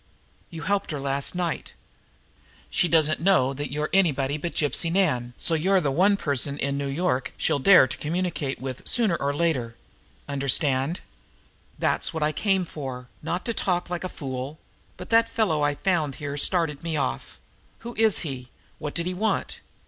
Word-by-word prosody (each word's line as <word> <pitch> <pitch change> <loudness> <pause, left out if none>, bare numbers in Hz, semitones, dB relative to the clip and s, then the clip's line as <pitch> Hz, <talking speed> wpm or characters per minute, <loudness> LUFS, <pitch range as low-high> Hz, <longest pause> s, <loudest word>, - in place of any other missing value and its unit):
You 160 -2 -7
helped 200 +4 0
her 150 -3 -3
last 140 +3 -1
night. 175 -2 -3 1.0
She 175 - +2
doesn't 155 -2 +3
know 165 -8 +3
you 145 +1 -3
are 155 - -1
anybody 145 -7 +2
but 170 +3 -4
Gypsy 165 +2 +1
Nan, 185 -4 +3
and 120 0 -8
so 165 - -1
you're 190 +5 +3
the 145 -6 0
one 195 +7 +4
person 140 -3 -1
in 140 -1 -1
New 140 0 -2
York 140 -2 -1
she'll 145 - +1
dare 180 0 +7
try 125 - -7
to - - -21
communicate 160 -4 -2
with 130 -1 -5
sooner 220 -8 +3
or 140 -1 0
later. 145 -7 0 0.5
Understand? 140 +2 0 0.8
That's - - 0
what 160 - 0
I 150 - +2
came 190 +3 +1
for, 130 -6 -7
not 180 - -3
to 230 - 0
talk 180 -4 -1
like 175 0 -2
a 185 - -3
fool 135 0 -5 0.4
but 180 - -9
that 230 0 +5
fellow 215 -10 +1
I 145 0 +2
found 160 -6 0
here 145 -1 -5
started 155 -1 +1
me 165 -2 -2
off. 65 - -3 0.4
Who 235 +1 -7
is 220 -3 +3
he? 130 -5 -5 0.3
What 150 -1 -5
did 170 - 0
he 180 - -2
want?" 215 +4 -1
155 Hz, 180 wpm, -25 LUFS, 140-180 Hz, 1.0 s, dare